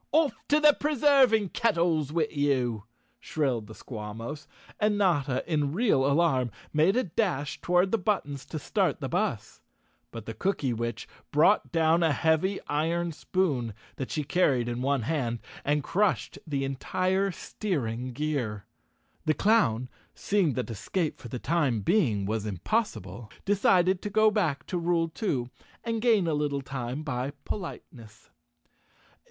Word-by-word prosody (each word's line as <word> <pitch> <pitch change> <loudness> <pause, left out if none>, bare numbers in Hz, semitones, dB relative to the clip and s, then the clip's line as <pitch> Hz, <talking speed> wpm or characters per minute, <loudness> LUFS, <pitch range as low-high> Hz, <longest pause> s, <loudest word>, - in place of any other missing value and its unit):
"Off 310 -2 +3
to 295 - +4
the 300 -1 +7
preserving 275 -7 +3
kettles 170 - +1
with 160 -1 -1
you!" 125 -7 0 0.3
shrilled 130 -8 -1
the 110 - -11
Squawmos, 115 +6 -7 0.3
and 210 -1 +2
Notta, 145 -10 +1
in 150 -4 0
real 175 - +2
alarm, 140 -4 +2 0.2
made 155 +7 +3
a 255 - +3
dash 165 -6 -2
toward 180 +2 +2
the 225 - +2
buttons 145 -9 -1
to 160 - -5
start 150 - 0
the - - -3
bus, - - -2 0.5
but 115 -2 -8
the 115 - -5
Cooky¬ 140 - -1
witch 115 0 -4 0.2
brought 160 +8 +4
down 165 0 +3
a 160 -3 +3
heavy 160 +7 +1
iron 165 +3 0
spoon, 145 - -1 0.2
that 135 - -4
she 155 - -2
car¬ 165 +1 +3
ried 120 -1 -2
in 120 0 -3
one 135 -2 +1
hand, 120 -3 -1 0.3
and 145 0 +1
crushed 205 +6 0
the 140 -3 -1
entire 185 +8 0
steering 130 - -3
gear. 125 -7 -2 0.6
The 155 - +3
clown, 130 - +2 0.3
seeing 195 -8 +1
that 125 -1 -3
escape 155 - -2
for - - -9
the 125 - -5
time 140 -6 0
being 110 - +2
was 110 +1 -2
impossible, 105 - -2 0.2
decided 190 -2 +3
to 210 - -4
go 215 +1 +4
back 170 -10 0
to 180 - -2
rule 170 -1 +1
two 140 - -2 0.3
and 230 -1 -2
gain 220 -6 +4
a 165 - 0
little 145 -1 -1
time 130 +2 -4
by 135 -1 -3
politeness. 115 - -8
150 Hz, 150 wpm, -28 LUFS, 125-190 Hz, 0.6 s, the